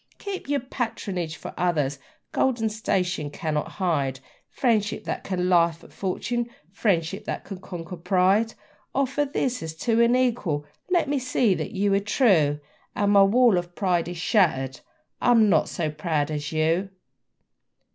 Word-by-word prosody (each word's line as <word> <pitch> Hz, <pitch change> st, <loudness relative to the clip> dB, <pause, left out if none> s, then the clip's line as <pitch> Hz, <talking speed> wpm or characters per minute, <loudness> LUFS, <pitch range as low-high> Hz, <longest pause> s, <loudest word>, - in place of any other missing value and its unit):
Keep 390 Hz, -7 st, -6 dB
your 285 Hz, -2 st, +1 dB
patronage 200 Hz, -, -3 dB
for 145 Hz, -, -8 dB
others! 150 Hz, -6 st, 0 dB, 0.3 s
Gold 260 Hz, -3 st, +1 dB
and 220 Hz, -1 st, 0 dB
station 185 Hz, -7 st, -1 dB
cannot 150 Hz, 0 st, -3 dB
hide 145 Hz, -9 st, 0 dB, 0.3 s
Friendship 220 Hz, -5 st, 0 dB
that -, -, -4 dB
can 180 Hz, -2 st, -1 dB
laugh 170 Hz, -2 st, +3 dB
at -, -, -16 dB
fortune, 235 Hz, +5 st, -2 dB, 0.2 s
friendship 195 Hz, -1 st, 0 dB
that -, -, -4 dB
can 195 Hz, -3 st, -7 dB
conquer 175 Hz, -1 st, -7 dB
pride! 190 Hz, +5 st, +2 dB, 0.4 s
Offer 275 Hz, +2 st, +1 dB
this 265 Hz, -3 st, -1 dB
as 160 Hz, -1 st, -6 dB
to 230 Hz, +7 st, +1 dB
an 235 Hz, +1 st, +4 dB
equal 225 Hz, -13 st, 0 dB, 0.2 s
let 350 Hz, -4 st, +2 dB
me 285 Hz, 0 st, 0 dB
see 250 Hz, -4 st, +2 dB
that -, -, -3 dB
you 200 Hz, 0 st, +1 dB
are 195 Hz, -, +4 dB
true, 195 Hz, -, +3 dB, 0.4 s
And 205 Hz, 0 st, +2 dB
my 200 Hz, -1 st, +7 dB
wall 215 Hz, 0 st, +5 dB
of 175 Hz, 0 st, -9 dB
pride 180 Hz, -4 st, +1 dB
is 175 Hz, 0 st, -5 dB
shattered: 155 Hz, -, +1 dB, 0.4 s
I -, -, +2 dB
am 225 Hz, -3 st, +6 dB
not -, -, +3 dB
so 155 Hz, -3 st, -2 dB
proud 155 Hz, -1 st, -1 dB
as 150 Hz, -1 st, -3 dB
you! 165 Hz, +5 st, +1 dB
190 Hz, 160 wpm, -25 LUFS, 165-230 Hz, 0.4 s, my